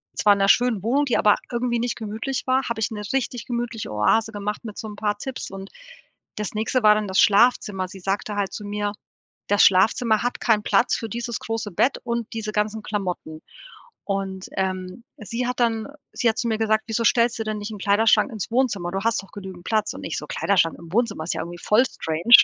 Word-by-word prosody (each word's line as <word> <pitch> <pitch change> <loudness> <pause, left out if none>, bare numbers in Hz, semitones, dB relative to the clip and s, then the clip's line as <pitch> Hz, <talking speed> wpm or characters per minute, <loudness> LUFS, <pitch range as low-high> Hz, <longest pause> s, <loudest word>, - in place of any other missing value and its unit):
zwar 205 - +5
in 200 - -2
'ner 195 - +3
schönen 240 -2 +3
Wohnung, 270 +6 +2
die 250 - +1
aber 210 - +5 0.2
irgendwie 240 0 0
nicht 240 +1 -1
gemütlich 225 +5 -4
war, 260 +1 +3
habe 230 -1 -2
ich 210 - +1
'ne 210 -1 -5
richtig 245 -3 -2
gemütliche 235 - -3
Oase 105 - +2
gemacht 205 0 -4
mit 215 -2 -7
so 220 - -5
'n 210 - -8
paar 210 -1 -1
Tipps 260 0 -6
und 195 0 -8 0.7
das 210 -2 -3
nächste 220 +3 0
war 210 0 +7
dann 210 -1 -1
das 190 0 +1
Schlafzimmer. 205 -3 +3
Sie 190 - -10
sagte 200 +2 -2
halt 200 -2 -1
zu 210 - -6
mir: 205 0 -2 0.5
„Das 205 0 +4
Schlafzimmer 215 +4 +4
hat 245 - -2
keinen 215 -3 +2
Platz 235 - +3
für 225 - -4
dieses 235 +1 -4
große 225 -2 -4
Bett 250 +10 +2
und 235 -2 -2
diese 220 -1 -3
ganzen 215 +1 -1
Klamotten“. 180 -7 -4 0.6
Und, 195 -1 -3
ähm, 185 +3 -3
sie 230 +3 -3
hat 250 0 -3
dann 225 -2 +1 0.3
sie 240 - +2
hat 220 - -2
zu 240 - -1
mir 220 - 0
gesagt: 220 -1 +2
„Wieso 225 +1 -1
stellst 235 +1 +3
du - - 0
denn 215 -1 -3
nicht 205 +1 -6
'n 215 - -6
Kleiderschrank 210 +4 +3
ins 215 -5 -5
Wohnzimmer? 225 -8 0
Du 195 +1 -2
hast 230 -3 +1
doch 195 - -17
genügend 190 -3 -9
Platz.“ 215 -1 0
Und - - -9
ich - - -3
so: - - -5
„Kleiderschrank 175 -5 +1
im 165 0 -12
Wohnzimmer 215 -8 0
ist 170 - -1
ja - - -2
irgendwie 175 +1 -7
voll 215 +4 +4
strange.“ 170 +1 +5
215 Hz, 220 wpm, -23 LUFS, 195-235 Hz, 0.7 s, war